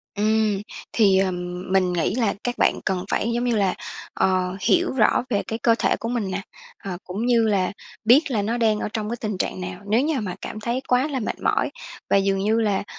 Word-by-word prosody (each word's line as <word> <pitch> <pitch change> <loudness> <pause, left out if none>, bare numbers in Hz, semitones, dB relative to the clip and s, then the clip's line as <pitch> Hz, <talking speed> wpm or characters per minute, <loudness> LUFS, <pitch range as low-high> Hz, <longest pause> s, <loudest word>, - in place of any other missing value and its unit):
Ừm, 215 -1 +2 0.3
thì, 200 -4 +4
ờ, 190 -1 +2 0.4
mình 185 -2 +3
nghĩ 175 +4 0
là 230 -5 +1
các 245 0 -2
bạn - - +2
cần 185 -2 -1
phải, 230 - 0
giống 240 - 0
như 245 -2 +1
là, 195 -3 +2 0.4
ờ, 185 -1 +1
hiểu 360 +1 +3
rõ 240 -1 +3
về 205 -5 0
cái 225 +1 -3
cơ 230 -1 +4
thể - - +2
của 230 - -3
mình 225 -6 -1
nè, 185 +2 -2 0.4
ờ, 185 -3 -4
cũng 200 +6 -4
như 240 -2 +4
là 195 -3 +1 0.3
biết 275 +6 +5
là 220 -4 +1
nó 225 +4 -1
đang 220 -3 +2
ở - - -2
trong 215 -1 -2
cái 235 - -2
tình 210 -4 -2
trạng 95 - -2
nào. 90 0 -6
Nếu 225 +4 +4
như 295 -1 0
mà 190 -5 -4
cảm 215 - -6
thấy 240 +4 -2
quá 250 +3 +3
là 280 -4 -2
mệt 220 - -3
mỏi - - +1 0.4
và - - +5
dường 195 0 +1
như 215 +3 +2
là, 205 -3 +1
215 Hz, 230 wpm, -23 LUFS, 195-235 Hz, 0.4 s, biết